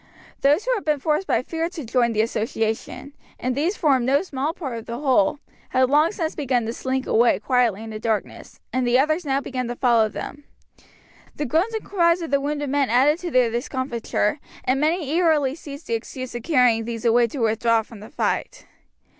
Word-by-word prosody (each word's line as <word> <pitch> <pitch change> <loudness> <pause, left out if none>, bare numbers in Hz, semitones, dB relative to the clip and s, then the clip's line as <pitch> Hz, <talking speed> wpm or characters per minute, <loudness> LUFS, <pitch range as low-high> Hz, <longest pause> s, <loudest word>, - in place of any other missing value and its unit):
Those 295 +9 +3
who - - +2
had 430 - -2
been 300 -2 +1
forced 305 +6 0
by 230 - +1
fear 325 +4 -2
to 325 -6 -7
join 235 0 +2
the 215 -1 +2
association 225 +4 -3 0.3
and 255 +1 -1
these 335 +9 0
formed 275 -6 +3
no 280 +5 +3
small 285 -4 -2
part 285 -8 -6
of 225 - -13
the 235 - -4
whole 260 -4 +2 0.3
had 260 0 +2
long 305 +3 +4
since 325 -6 -3
begun 255 -5 0
to 225 - -3
slink 260 +1 -2
away 235 +1 +3
quietly 240 -5 +1
in 225 - -7
the 215 - -6
darkness, 220 -1 -3
and 255 -1 0
the 240 +1 +4
others 310 +5 +1
now 275 0 +1
began 255 -3 -4
to 240 - -4
follow 235 -3 +3
them. 290 +6 -8 0.9
The 295 - -3
groans 340 - 0
and 440 - -4
cries 340 -2 +2
of 325 - -6
the 280 0 +2
wounded 290 -1 -2
men 280 -2 +1
added 275 +7 +3
to 360 - -4
their 250 -5 +3
discomfiture, 240 0 -2 0.2
and 260 +2 +1
many 320 0 +1
eagerly 310 -4 +2
seized 290 -1 -10
the - - -3
excuse 255 +3 -5
of 240 - -5
carrying 245 -6 +3
these 230 0 -5
away 235 +1 +4
to 230 - -8
withdraw 230 -1 +2
from 220 -1 -13
the 215 - -11
fight. - - -2
260 Hz, 205 wpm, -23 LUFS, 235-300 Hz, 0.9 s, long